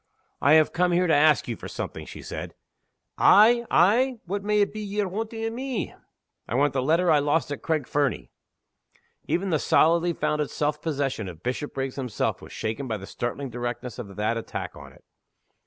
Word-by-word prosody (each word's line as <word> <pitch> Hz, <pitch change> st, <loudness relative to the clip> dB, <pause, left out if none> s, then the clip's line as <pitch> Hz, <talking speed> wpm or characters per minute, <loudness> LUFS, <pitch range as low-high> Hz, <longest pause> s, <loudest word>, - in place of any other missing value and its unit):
"I 145 Hz, -, +5 dB
have 155 Hz, -1 st, +5 dB
come 180 Hz, 0 st, +2 dB
here 180 Hz, +1 st, +3 dB
to 165 Hz, -, +3 dB
ask 150 Hz, -1 st, +4 dB
you 120 Hz, -, -3 dB
for -, -, -9 dB
something," -, -, -6 dB
she -, -, -9 dB
said. -, -, -6 dB, 0.6 s
"Ay? 235 Hz, +3 st, +6 dB
ay? 235 Hz, +9 st, +4 dB
What 195 Hz, +3 st, -3 dB
may 210 Hz, 0 st, +2 dB
it 200 Hz, -, +1 dB
be 215 Hz, -, -5 dB
ye're 205 Hz, -1 st, -2 dB
wanting 225 Hz, +4 st, -4 dB
of 225 Hz, -, -2 dB
me?" 255 Hz, -1 st, -3 dB, 0.5 s
"I -, -, -3 dB
want 140 Hz, +1 st, +2 dB
the 130 Hz, -, 0 dB
letter 165 Hz, +6 st, +3 dB
I 150 Hz, -, +5 dB
lost 145 Hz, +1 st, 0 dB
at 145 Hz, -, -4 dB
Craig 155 Hz, -5 st, -1 dB
Fernie." 140 Hz, -, -1 dB, 1.0 s
Even 185 Hz, +2 st, 0 dB
the 155 Hz, -, +2 dB
solidly 170 Hz, +4 st, +3 dB
founded 150 Hz, -2 st, -1 dB
self 150 Hz, 0 st, -1 dB
possession 140 Hz, -, -2 dB
of 85 Hz, -2 st, -10 dB
Bishopriggs 135 Hz, +1 st, -3 dB
himself 125 Hz, -5 st, -2 dB
was -, -, -12 dB
shaken 110 Hz, +5 st, -4 dB
by 110 Hz, -2 st, -2 dB
the 95 Hz, -, -9 dB
startling 125 Hz, +5 st, -4 dB
directness 120 Hz, 0 st, -5 dB
of 100 Hz, -5 st, -8 dB
that 105 Hz, +2 st, 0 dB
attack 115 Hz, -, -5 dB
on -, -, -11 dB
it. -, -, -21 dB
150 Hz, 190 wpm, -25 LUFS, 130-190 Hz, 1.0 s, Ay